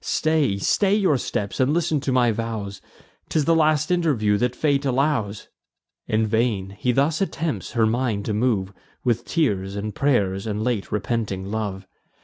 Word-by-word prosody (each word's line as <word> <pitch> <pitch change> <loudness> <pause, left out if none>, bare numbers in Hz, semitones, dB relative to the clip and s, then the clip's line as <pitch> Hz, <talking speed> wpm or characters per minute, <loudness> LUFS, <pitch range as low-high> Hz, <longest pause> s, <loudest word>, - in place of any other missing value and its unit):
Stay, 155 -10 +1
stay 195 - +2
your 190 -8 +3
steps, 105 -5 -3
and 135 +4 +2
listen 165 -3 +1
to 140 -1 -2
my 125 -2 +3
vows: 105 -3 -4 0.5
'Tis 155 -3 +1
the 165 - +4
last 155 -1 +2
interview 140 -13 +2
that 125 +3 0
fate 140 -1 +1
allows!" 130 -7 0 0.6
In 110 +1 +1
vain 110 -3 0
he 125 - +1
thus 145 +6 +1
attempts 165 -5 -2
her 115 -2 +3
mind 110 -3 0
to 110 - -1
move 105 -4 0 0.3
With 120 -1 0
tears, 100 - 0
and 105 +1 -4
pray'rs, 100 -7 +1
and 105 0 -2
late 115 -4 -2
repenting 105 -3 -2
love. 100 -3 -3
120 Hz, 160 wpm, -23 LUFS, 105-145 Hz, 0.6 s, the